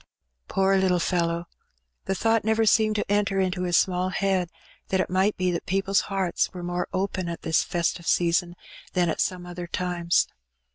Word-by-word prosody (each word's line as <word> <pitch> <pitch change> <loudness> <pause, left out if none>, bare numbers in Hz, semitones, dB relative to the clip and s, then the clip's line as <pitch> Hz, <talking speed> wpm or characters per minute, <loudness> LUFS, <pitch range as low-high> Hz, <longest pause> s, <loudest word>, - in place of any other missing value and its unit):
Poor 195 0 +2
little 190 -1 +2
fellow! 170 -1 0 0.6
the 195 - -1
thought 225 +3 +2
never 220 +1 +2
seemed 215 0 +3
to 210 - 0
enter 200 -1 +1
into 185 -1 0
his 175 -1 +3
small 185 0 +1
head 190 -2 0 0.4
that 190 - 0
it' 185 - -1
might 190 +3 +2
be 185 -1 +1
that, 170 - -4
people's 195 +1 +2
hearts 190 -3 0
were 180 - -6
more 175 0 -2
open 185 -2 -2
at 170 - -6
this 160 - +2
festive 170 -1 -2
season 175 0 +2 0.4
than 180 -2 +2
at - - -1
some 180 -1 -1
other 175 0 -7
times. 175 -1 0
185 Hz, 180 wpm, -25 LUFS, 175-195 Hz, 0.6 s, seemed